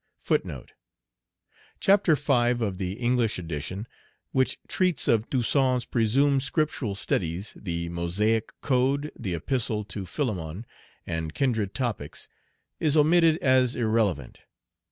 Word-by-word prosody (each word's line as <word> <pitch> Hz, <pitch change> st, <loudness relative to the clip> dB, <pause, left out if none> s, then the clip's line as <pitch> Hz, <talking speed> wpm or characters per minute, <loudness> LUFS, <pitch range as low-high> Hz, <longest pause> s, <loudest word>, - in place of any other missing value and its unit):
* -, -, -24 dB, 1.5 s
Chapter 195 Hz, -5 st, +4 dB
V. 140 Hz, 0 st, 0 dB, 0.3 s
of 95 Hz, -3 st, -4 dB
the 95 Hz, -1 st, -2 dB
English 120 Hz, 0 st, 0 dB
edition, 90 Hz, +4 st, -5 dB, 0.5 s
which 130 Hz, -1 st, +1 dB
treats 185 Hz, -3 st, +1 dB
of 115 Hz, -1 st, +2 dB
"Toussaint's 130 Hz, -1 st, +2 dB
presumed 135 Hz, +4 st, +2 dB
Scriptural 140 Hz, -, -1 dB
studies," 90 Hz, 0 st, -2 dB
the 85 Hz, -3 st, -4 dB
Mosaic 100 Hz, +7 st, 0 dB
code, 140 Hz, +2 st, +1 dB
the 95 Hz, -7 st, -3 dB
Epistle 110 Hz, -, 0 dB
to 100 Hz, -2 st, -6 dB
Philemon, 95 Hz, -, -3 dB, 0.4 s
and 80 Hz, -2 st, -4 dB
kindred 110 Hz, -7 st, 0 dB
topics, 110 Hz, -, -3 dB, 0.5 s
is 155 Hz, -1 st, +2 dB
omitted 160 Hz, +1 st, +5 dB
as 130 Hz, -1 st, +3 dB
irrelevant. 110 Hz, -, 0 dB
115 Hz, 115 wpm, -26 LUFS, 95-135 Hz, 1.5 s, omitted